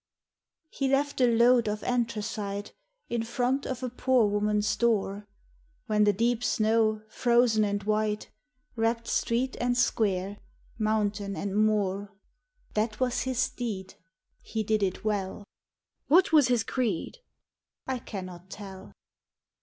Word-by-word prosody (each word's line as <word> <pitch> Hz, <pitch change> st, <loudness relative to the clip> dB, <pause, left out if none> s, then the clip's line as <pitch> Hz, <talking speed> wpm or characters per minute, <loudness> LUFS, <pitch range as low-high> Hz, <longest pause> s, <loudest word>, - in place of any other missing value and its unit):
He 275 Hz, -, -1 dB
left 275 Hz, 0 st, +1 dB
a 250 Hz, -, +6 dB
load 235 Hz, 0 st, +4 dB
of 210 Hz, 0 st, -3 dB
anthracite 215 Hz, -4 st, -2 dB, 0.3 s
In 235 Hz, -1 st, -1 dB
front 245 Hz, +4 st, -1 dB
of 260 Hz, 0 st, -4 dB
a 250 Hz, -, -1 dB
poor 250 Hz, -1 st, +3 dB
woman's 210 Hz, 0 st, +1 dB
door, 210 Hz, -3 st, 0 dB, 0.6 s
When 210 Hz, -3 st, +3 dB
the 205 Hz, -, +5 dB
deep 235 Hz, +4 st, 0 dB
snow, 220 Hz, 0 st, +2 dB
frozen 235 Hz, -1 st, +3 dB
and 205 Hz, -1 st, -1 dB
white, 215 Hz, 0 st, -1 dB, 0.4 s
Wrapped 230 Hz, 0 st, 0 dB
street 250 Hz, +3 st, 0 dB
and 245 Hz, 0 st, +1 dB
square, 205 Hz, -4 st, 0 dB, 0.4 s
mountain 210 Hz, -2 st, 0 dB
and 200 Hz, 0 st, -3 dB
moor. 205 Hz, -2 st, +1 dB, 0.6 s
That 215 Hz, 0 st, -1 dB
was 250 Hz, -2 st, +1 dB
his 255 Hz, -2 st, +1 dB
deed. 210 Hz, -6 st, -5 dB, 0.5 s
He 220 Hz, 0 st, -3 dB
did 215 Hz, 0 st, +1 dB
it 190 Hz, 0 st, -1 dB
well. 205 Hz, -1 st, -2 dB, 0.3 s
" -, -, -56 dB
What 350 Hz, +5 st, +5 dB
was 300 Hz, -5 st, +6 dB
his 245 Hz, -3 st, +2 dB
creed? 240 Hz, -, -2 dB, 0.3 s
" -, -, -65 dB, 0.3 s
I 260 Hz, -1 st, -2 dB
cannot 185 Hz, -4 st, -8 dB
tell. 195 Hz, -2 st, -10 dB
220 Hz, 135 wpm, -28 LUFS, 205-245 Hz, 0.6 s, a